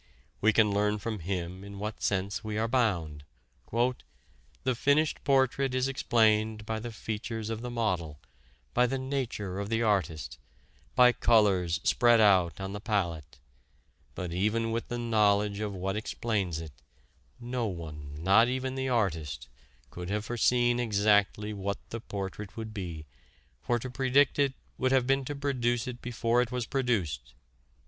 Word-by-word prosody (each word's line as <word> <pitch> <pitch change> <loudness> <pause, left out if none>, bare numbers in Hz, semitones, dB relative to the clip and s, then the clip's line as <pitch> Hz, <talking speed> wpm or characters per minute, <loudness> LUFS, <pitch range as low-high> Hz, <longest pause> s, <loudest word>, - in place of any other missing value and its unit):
We 110 - +5
can 105 -1 +4
learn 105 +1 +1
from 110 0 -4
him 90 +1 -4
in 100 0 -9
what 105 +2 -5
sense 100 +2 -1
we 110 -1 -3
are 110 +1 +1
bound. 90 - 0 1.4
"The 130 - +2
finished 145 +5 +2
portrait 135 -1 +2
is 130 +1 +1
explained 110 -4 +2
by 110 0 -2
the 120 +1 -6
features 110 0 -4
of 115 0 -4
the 125 - -4
model, 90 -11 -2 0.5
by 125 - +4
the 135 +2 -1
nature 125 -8 -3
of 100 0 -4
the 115 0 +1
artist, 80 - -1 0.6
by 125 -1 +7
colors 95 -9 +3
spread 120 +3 +4
out 95 -7 +4
on 95 0 -4
the 105 - -4
palette; 85 - -2 0.8
but 90 -2 -4
even 110 +5 0
with 115 +1 -2
the 120 - -3
knowledge 105 -3 +2
of 105 -1 -2
what 95 +1 -3
explains 105 -5 -2
it, 80 -3 -8 0.7
no 120 -1 -2
one, 75 -6 -7
not 100 +6 +6
even 130 +1 -2
the 130 0 -2
artist, 80 - -1 0.4
could 90 0 -6
have 105 +1 -2
foreseen 120 +1 +2
exactly 105 -1 +2
what 100 0 -3
the 115 - -4
portrait 100 0 -6
would 110 -1 -6
be, 85 -7 -6 0.6
for 120 - +1
to 125 +2 -6
predict 135 +2 +3
it 140 -2 +2 0.2
would 130 0 +2
have 130 -2 +3
been 135 +1 +2
to 145 - -4
produce 120 -4 0
it 125 -1 -6
before 120 0 +1
it 125 -1 -2
was 125 -2 -2
produced...." 90 - -1
110 Hz, 155 wpm, -29 LUFS, 95-120 Hz, 1.4 s, by